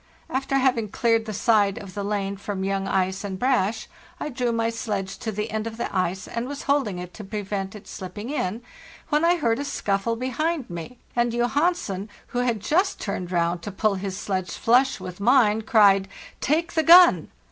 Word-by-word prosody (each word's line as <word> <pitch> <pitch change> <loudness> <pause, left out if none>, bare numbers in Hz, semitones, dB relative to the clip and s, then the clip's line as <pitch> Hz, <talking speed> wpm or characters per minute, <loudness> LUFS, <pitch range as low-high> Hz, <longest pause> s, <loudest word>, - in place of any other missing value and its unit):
After 270 +1 -1
having 250 -5 +1
cleared 230 +1 +1
the 220 - -4
side 205 -2 +2
of 195 -2 -9
the 205 - -4
lane 200 -1 -2
from 195 -1 -4
young 195 0 -1
ice 190 +1 0
and 195 -2 -4
brash, 225 -3 +1 0.2
| 300 - -6
drew 245 -1 0
my 230 0 0
sledge 205 -4 -3
to 220 - -3
the 210 +2 -4
end 220 +1 -2
of 225 0 -7
the 235 - -4
ice, 185 +1 -1
and 235 +1 -4
was 285 +1 -6
holding 275 -10 +1
it 180 0 -7
to 215 - -9
prevent 200 -1 -4
it 210 -1 -12
slipping 205 +6 -7
in, 225 -5 -2 0.5
when 300 +1 +2
I 345 +1 +5
heard 235 -8 0
a - - -2
scuffle 225 -5 -1
behind 260 +4 -2
me, 170 +9 -7 0.2
and 240 0 +2
Johansen, 240 - 0 0.2
who 245 - -2
had 240 -4 0
just 365 - +1
turned 185 -3 -4
round 170 0 0
to 205 - -6
pull 215 +2 +1
his 195 0 -4
sledge 190 -3 -3
flush 255 +3 +3
with 180 0 -8
mine,* 220 -1 +4
cried,' 200 -3 +4 0.3
Take 330 +4 0
the 320 - +3
gun! 345 +3 +7
220 Hz, 195 wpm, -24 LUFS, 195-250 Hz, 0.5 s, gun